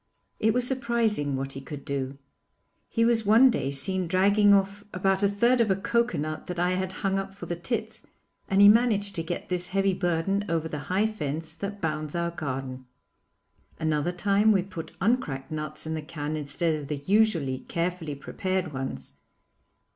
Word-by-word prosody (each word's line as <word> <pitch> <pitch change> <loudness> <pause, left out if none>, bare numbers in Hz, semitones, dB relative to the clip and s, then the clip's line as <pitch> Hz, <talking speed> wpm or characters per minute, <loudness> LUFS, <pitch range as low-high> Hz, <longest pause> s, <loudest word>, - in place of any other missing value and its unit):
It 220 - +3
was 250 -1 +3
surprising 235 - 0
what 135 +1 -3
he 135 - -7
could 140 +1 -8
do. 135 -1 -3 0.7
He 230 -1 +2
was 230 -1 +3
one 225 +5 +6
day 135 - -1
seen 180 +7 0
dragging 200 +3 +4
off 200 +1 +2
about 190 +1 +1
a 200 - +4
third 235 +5 +3
of 225 - +2
a 190 - +3
coconut 195 -7 -1
that 180 - -5
I 180 +1 +2
had 185 0 -1
hung 195 0 +2
up 195 0 -6
for 200 - -8
the 175 - -3
tits, 220 +5 -4 0.5
and 195 +1 +4
he - - +10
managed 205 -2 +4
to 165 - -2
get 165 +2 -5
this 180 -1 -1
heavy 195 +1 +1
burden 180 +2 0
over 165 -1 0
the 150 -2 -5
high 190 +4 +2
fence 160 -6 -4
that 200 0 -5
bounds 155 -1 -2
our 170 0 -1
garden. 130 -4 -5 0.9
Another 155 +1 0
time 200 +4 +3
we 195 -3 +3
put 185 -4 -8
uncracked 165 - 0
nuts 155 0 -4
in 160 - -3
the 160 - -3
can 150 -1 -4
instead 155 +3 -1
of 140 - -8
the 150 - -2
usually 165 -6 +2
carefully 170 -2 -3
prepared 185 +4 -3
ones. 130 - -5
180 Hz, 180 wpm, -27 LUFS, 155-205 Hz, 0.9 s, he